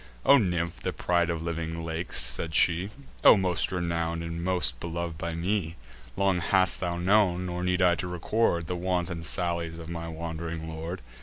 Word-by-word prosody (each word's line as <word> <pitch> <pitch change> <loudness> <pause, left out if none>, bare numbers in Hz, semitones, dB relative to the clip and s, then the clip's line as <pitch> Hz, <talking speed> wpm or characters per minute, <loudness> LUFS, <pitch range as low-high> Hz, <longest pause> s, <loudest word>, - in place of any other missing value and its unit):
"O 140 - +7
nymph, 85 -5 -1
the - - -2
pride 85 -1 +1
of 80 -1 -2
living 85 0 -4
lakes," 80 +1 -2
said 80 -2 0
she, 90 +3 +3 0.3
"O - - +9
most 90 -2 +1
renown'd, 85 -2 -2
and 85 0 -5
most 90 0 +1
belov'd 85 -1 -4
by 85 0 -3
me, 85 -1 -1 0.4
Long 95 -2 +2
hast 95 +2 +3
thou 85 -1 -2
known, 90 -1 +3
nor 90 0 -3
need 90 0 +1
I 90 -1 +5
to 90 +1 -3
record, 90 0 0
The 90 - -3
wanton 90 -1 -2
sallies 85 0 -1
of 85 -1 -9
my 85 -1 -5
wand'ring 80 0 -5
lord. 80 +1 -5
85 Hz, 175 wpm, -27 LUFS, 85-90 Hz, 0.4 s, O